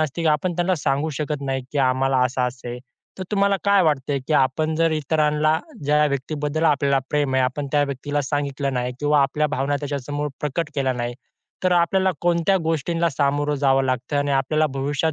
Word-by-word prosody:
असते, 155 +2 -2
की 165 - +2
आपण 180 +4 -2
त्यांना 180 +1 +1
सांगू 145 +4 +1
शकत 150 -1 -3
नाही, 135 -1 -2
की 145 - -1
आम्हाला 130 +1 +1
असं-असं 125 -1 -2
आहे. 120 +1 -5 0.4
तर - - -3
तुम्हाला 200 -1 +2
काय 200 -1 +4
वाटतंय, 145 -3 0
की - - 0
आपण 155 +4 +2
जर 165 0 +2
इतरांना 155 0 +1 0.3
ज्या 150 +1 +3
व्यक्तीबद्दल 150 +3 -2
आपल्याला 140 -3 +3
प्रेम 145 -3 0
आहे, 130 - +3
आपण 135 +3 -2
त्या 145 -1 +4
व्यक्तीला 145 +1 -3
सांगितलं 140 -2 -2
नाही 125 0 -1
किंवा 145 -1 +3
आपल्या 150 +2 +1
भावना 140 +2 0
त्याच्यासमोर 145 0 -3
प्रकट 150 +2 -2
केल्या 135 -2 +1
नाही, 120 -1 -3 0.5
तर 185 - +3
आपल्याला 185 +2 +3
कोणत्या 175 +2 +2
गोष्टींना 165 +2 0
सामोरं 145 +1 0
जावं 135 -1 +2
लागतं 130 +2 -1
आणि 145 0 0
आपल्याला 145 +3 +2
भविष्यात 145 +3 -1
145 Hz, 185 wpm, -22 LUFS, 135-155 Hz, 0.5 s, काय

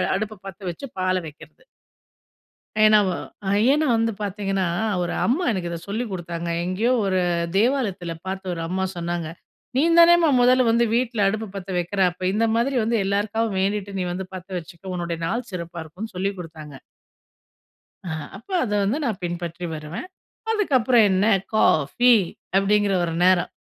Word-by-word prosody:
அடுப்ப 215 0 -4
பத்த 190 - -9
வச்சு 275 +11 -8
பால 185 0 +1
வைக்கிறது. 155 - -14 1.2
ஏன்னா 215 0 +7
வ 185 - 0 0.6
ஏன்னா 300 +2 +2
வந்து 225 0 +1
பார்த்தீங்கன்னா, 195 -2 -1 0.4
ஒரு 175 - -2
அம்மா 275 +10 +1
எனக்கு 185 -5 -2
இத 170 - -4
சொல்லிக் 220 +2 -3
குடுத்தாங்க. 170 -2 -4 0.2
எங்கேயோ 195 +7 0
ஒரு 190 -1 +1 0.4
தேவாலயத்துல 210 -7 0
பார்த்து 190 -1 -4
ஒரு 165 - -5
அம்மா 190 +2 -1
சொன்னாங்க. 170 -1 -3 0.5
"நீந்தானேம்மா 335 +2 +6
மொதல்ல 250 0 +4
வந்து 235 +1 +3
வீட்ல 235 -4 +1
அடுப்பு 220 +2 -2
பத்த 195 -1 -7
வைக்கிற, 175 +3 -3
அப்ப 180 +1 -4
இந்த 225 +2 +2
மாதிரி 255 +3 +1
வந்து 230 +1 +1
எல்லாருக்காகவும் 205 +1 0
வேண்டிட்டு 200 0 -2
நீ 180 - -1
வந்து 185 +2 -4
பத்த 185 +1 -9
வச்சுக்கோ. 175 +3 -9
உன்னோட 170 -1 -3
நாள் 235 +7 -2
சிறப்பா 170 -2 -6
இருக்கும்னு" 185 +8 -8
சொல்லிக் 195 +2 -2
குடுத்தாங்க. 155 -4 -9 1.3
ஆ - - -3 0.3
அப்ப 225 - -18
அத 225 - -3
வந்து 210 +8 0
நான் 220 -6 -2
பின்பற்றி 175 0 -4
வருவேன். 155 - -7 0.4
அதுக்கப்புறம் 260 - +3
என்ன 190 +2 +2 0.3
காஃபி, 215 - +4 0.4
அப்டிங்கிற 200 0 +2
ஒரு 165 -1 -2
நேரம். 185 -1 +3
195 Hz, 150 wpm, -23 LUFS, 175-230 Hz, 1.3 s, ஏன்னா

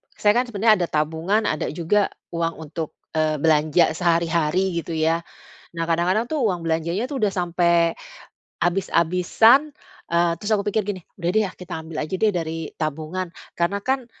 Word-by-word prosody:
saya 205 - +3
kan 245 +3 +2
sebenarnya 220 -1 +4
ada 175 - 0
tabungan, 160 +8 0
ada 155 -6 -1
juga 175 +6 +1 0.2
uang 165 -1 -1
untuk, 160 0 -5 0.2
eee, 155 -1 +2
belanja 155 +1 +4
sehari-hari, 170 +1 +1
gitu 165 0 -5
ya. 160 +1 +2 0.6
Nah, 165 - 0
kadang-kadang 180 +7 +1
tuh 310 - 0
uang 180 -6 0
belanjanya 170 +8 -1
itu 280 - -6
udah 210 -4 +2
sampai 170 -2 +2 0.7
abis-abisan, 185 - +3 0.4
eee, 170 0 +3
terus 205 +5 -5
aku 200 - 0
pikir 215 +1 +1
gini, 200 -3 -3 0.2
"Udah 175 -1 -2
deh, 215 - +4
ya, - - -6
kita 180 - -10
ambil 160 -1 -8
aja 170 - -5
deh 215 +3 +3
dari 165 -2 -2 0.2
tabungan." 160 +4 -3 0.3
Karena 175 +4 +1
kan 260 -2 -1
175 Hz, 165 wpm, -23 LUFS, 165-205 Hz, 0.7 s, sebenarnya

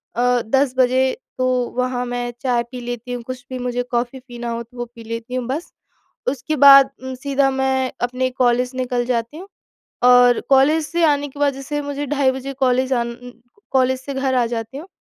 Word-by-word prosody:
अ, 245 +1 +2
10 265 +3 +1
बजे 260 +1 +3 0.3
तो 255 - +1 0.3
वहाँ 250 0 -1
मैं 245 0 -3
चाय 245 -3 +1
पी 250 - -6
लेती 245 0 -5
हूँ 245 - -4
कुछ 255 -1 -7
भी 255 - -5
मुझे 245 0 -2
कॉफी 240 +2 -1
पीना 240 -1 -6
हो 235 0 -3
तो 240 +2 -20
वो 240 - -3
पी 230 - -11
लेती 230 +2 -6
हूँ 255 -1 -2
बस। 290 +7 -4 0.6
उसके 285 +3 -3
बाद 275 -1 +8
उम, 260 0 -5
सीधा 275 +1 +1
मैं 265 -1 0
अपने 255 +1 0
कॉलेज 250 0 +1
निकल 250 -1 -1
जाती 235 +3 -2
हूँ। 380 +3 -10 0.6
और 245 -1 +6
कॉलेज 280 +4 +4
से 340 +3 -1
आने 290 -1 +2
के 285 +1 -13
बाद 285 -1 +2
जैसे 275 +2 -4
मुझे 285 0 -4
ढ़ाई 275 -2 +2
बजे 265 +1 -5
कॉलेज 260 0 +1
आ 240 - +1
न 235 - -5
न 245 - -9 0.4
कॉलेज 260 -1 +2
से 280 +2 -7
घर 265 0 -1
आ 245 -2 +3
जाती 230 +2 -5
हूँ। 325 +6 -9
255 Hz, 210 wpm, -20 LUFS, 245-270 Hz, 0.6 s, बाद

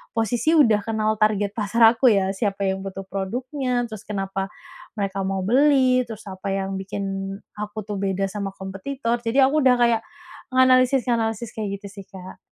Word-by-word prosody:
posisi 240 +8 +1
udah 230 -9 +5
kenal 220 -1 0
target 210 -2 +2
pasar 220 +2 -1 0.2
aku 260 - +4
ya 195 -4 +3
siapa 200 0 -2
yang 190 0 -2
butuh 195 0 -6
produknya 245 +7 -2
terus 215 -3 -9
kenapa 195 -1 -3 0.5
mereka 195 -2 -2
mau 195 0 -1
beli 255 +1 +4
terus 220 -2 -8
apa 190 +1 -7
yang 195 0 -2
bikin 195 +1 -5 0.6
aku 210 0 -5
tuh 205 0 -5
beda 195 0 -1
sama 200 -2 -4
kompetitor 230 +6 -3
jadi 240 +3 +2
aku 305 - +2
udah 250 - +6
kayak 235 -2 +3 0.5
menganalisis-nganalisis 245 -3 +3
kayak 200 -2 -5
gitu 200 - -8
sih, 195 -1 -11
Kak. 190 -1 -11
215 Hz, 165 wpm, -23 LUFS, 195-245 Hz, 0.6 s, udah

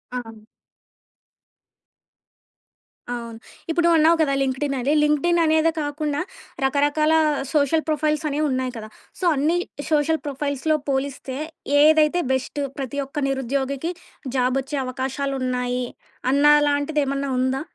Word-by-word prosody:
అవును. 225 -3 -7 2.7
అవును. 230 -1 -7 0.3
ఇప్పుడు 340 +1 +1
నువ్వన్నావు 330 0 +5
కదా 285 -3 +2
లింక్డ్ఇన్ 275 +1 -1
అని 270 +4 +1
లింక్డ్ఇన్ 300 +4 +2
అనేదే 315 +1 +3
కాకుండా 290 0 -2 0.4
రకరకాల 290 +3 +2 0.4
సోషల్ 305 +1 +2
ప్రొఫైల్స్ 305 0 0
అనేవున్నాయి 275 -3 -1
కదా! 215 -1 -8 0.3
సో 370 - -2
అన్నీ 305 +5 +1 0.3
సోషల్ 310 +1 +2
ప్రొఫైల్స్‌లో 285 +2 -1
పోలిస్తే 265 -1 -2 0.5
ఏదైతే 315 +2 +4
బెస్ట్ 260 +2 -2 0.2
ప్రతి 275 0 -4
ఒక్క 285 +2 -4
నిరుద్యోగికి 270 +4 -2 0.4
జాబొచ్చే 265 +3 0
అవకాశాలున్నాయి 255 -1 -2 0.5
అన్న 280 +2 +3 0.2
అలాంటిదేమన్నా 285 -1 0
ఉందా? 260 +1 0
280 Hz, 100 wpm, -23 LUFS, 265-305 Hz, 2.7 s, నువ్వన్నావు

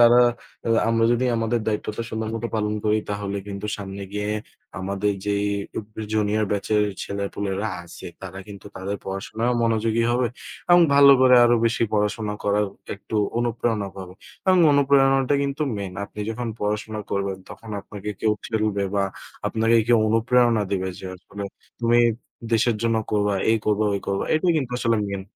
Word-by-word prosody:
তারা, 120 +1 +7 0.7
আমরা 115 0 +3
যদি 120 +2 +1
আমাদের 115 +1 0
দায়িত্বটা 105 +1 -2
সুন্দরমতো 110 +1 -3
পালন 105 0 0
করি 105 0 +3
তাহলে 100 -1 -3
কিন্তু 100 +1 -5
সামনে 100 -1 -7
গিয়ে 105 0 -2 0.5
আমাদের 100 +2 -1
যে 100 - +1 0.8
জুনিয়র 110 0 +1
ব্যাচের 105 +1 +1 0.2
ছেলেপুলেরা 100 +1 -3 0.2
আছে 85 - -10 0.2
তারা 95 0 -7
কিন্তু 100 -1 -10
তাদের 100 +2 -3
পড়াশোনায়ও 110 +5 -2
মনোযোগী 115 0 +1
হবে 120 +1 +2 0.4
এবং 175 - +8
ভালো 140 0 +8
করে 130 -1 +7
আরও 120 0 +5
বেশি 115 0 0
পড়াশোনা 105 0 0
করার 105 +1 +2 0.3
একটু 105 +2 -6 0.2
অনুপ্রেরণা 115 -3 -1
পাবে 95 -1 -8 0.3
এবং 185 -1 +5
অনুপ্রেরণাটা 135 -1 +4
কিন্তু 140 +2 -2
মেন। 100 -2 -5
আপনি 105 - -9
যখন 115 +1 -4
পড়াশোনা 105 +1 -2
করবেন 100 -1 -1
তখন 115 - -10
আপনাকে 105 +1 -7
কেউ 110 -1 +3
ঠেলবে 105 -3 0
বা 100 -1 +2 0.4
আপনাকে 115 +1 +2
কেউ 120 -1 +5
অনুপ্রেরণা 115 0 +3
দিবে 95 -1 -1
যে 95 - -7
আসলে 100 +2 -8 0.4
তুমি 120 0 +4 0.5
দেশের 115 0 +3
জন্য 115 -1 +2 0.2
করবা, 105 -1 +2 0.2
এই 115 - +4
করবা, 105 0 +2
ওই 100 - -2
করবা 100 0 0
এটাই 170 +3 +3
কিন্তু 135 -5 -1
আসলে 115 -2 +2
মেন 100 -1 -4
110 Hz, 155 wpm, -23 LUFS, 100-120 Hz, 0.8 s, এবং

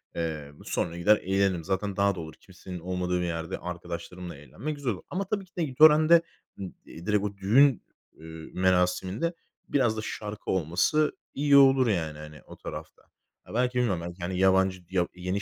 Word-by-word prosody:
eee, 75 -4 -3
sonra 85 0 -2
gider 105 +5 +5
eğlenirim. 95 -3 0
Zaten 95 +1 -2
daha 100 -1 +2
doğru, 80 -2 -7
kimsenin 90 +2 -10
olmadığı 90 0 -2
bir - - -1
yerde 85 +1 -3
arkadaşlarımla 90 0 -7
eğlenmek 75 - -6
güzel 135 -4 -2
olur. 90 - -10
Ama 195 +2 -2
tabii 200 -2 -2
ki 180 - -33
de 170 - +1
i 135 -4 -4
törende, 155 +2 +7 0.4
ı - - -7 0.2
eee, 85 - -11
direkt 105 -1 +1
o 100 -1 -4
düğün, 120 +5 +4 0.4
ııı, 80 0 -10
merasiminde 95 - +1 0.4
biraz 120 -6 +2
da - - -2
şarkı 105 -1 -5
olması 95 - +2 0.2
iyi 140 0 +4
olur 135 -2 +6
yani, 80 -7 -1
hani, 75 0 -11
o - - -13
tarafta. - - -8 0.5
Ya, - - -10
belki 125 +1 +1
bilmiyorum, 100 -9 +1
belki, 85 +1 -8
hani, 90 +1 -3
yabancı 95 -1 +3
yahut 90 -2 0
yeni 90 +2 -3
95 Hz, 180 wpm, -27 LUFS, 85-125 Hz, 0.5 s, törende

